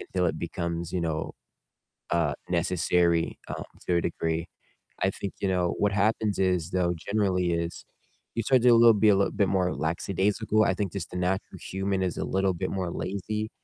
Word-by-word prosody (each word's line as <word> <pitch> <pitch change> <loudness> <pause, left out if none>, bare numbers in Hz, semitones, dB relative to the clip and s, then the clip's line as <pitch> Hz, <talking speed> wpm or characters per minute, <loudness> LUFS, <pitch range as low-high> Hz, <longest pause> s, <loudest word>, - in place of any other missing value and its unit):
until 90 -1 -1
it 80 - -1
becomes, 85 0 -3
you 90 - 0
know, 80 -2 -2 0.8
uh, 85 -4 +2 0.2
necessary, 85 -1 +1
um, - - -4 0.2
to 90 - +3
a - - +2
degree. 80 0 -2 0.5
I 95 - +3
think, 100 0 -5
you 100 - +1
know, 90 -2 +1
what 105 -1 +2
happens 105 0 +1
is 90 -3 +1
though 90 -2 +1
generally 90 -2 0
is 85 0 -3 0.5
you 115 - 0
start 130 +2 +4
to 125 -1 +7
lil 115 0 +7
be 105 +1 +4
a 100 - +6
little 100 0 +2
bit 100 - +2
more 90 -2 +1
lackadaisical, 100 +6 +1
I 95 - +2
think 100 -2 -2
just 95 -5 -4
the 90 - -4
natural 90 +2 -2
human 95 0 -2
is 90 -3 -2
a - - -2
little 95 0 +1
bit 90 +2 -3
more 95 -3 -2
lazy 105 +4 -3
95 Hz, 190 wpm, -27 LUFS, 85-100 Hz, 0.8 s, to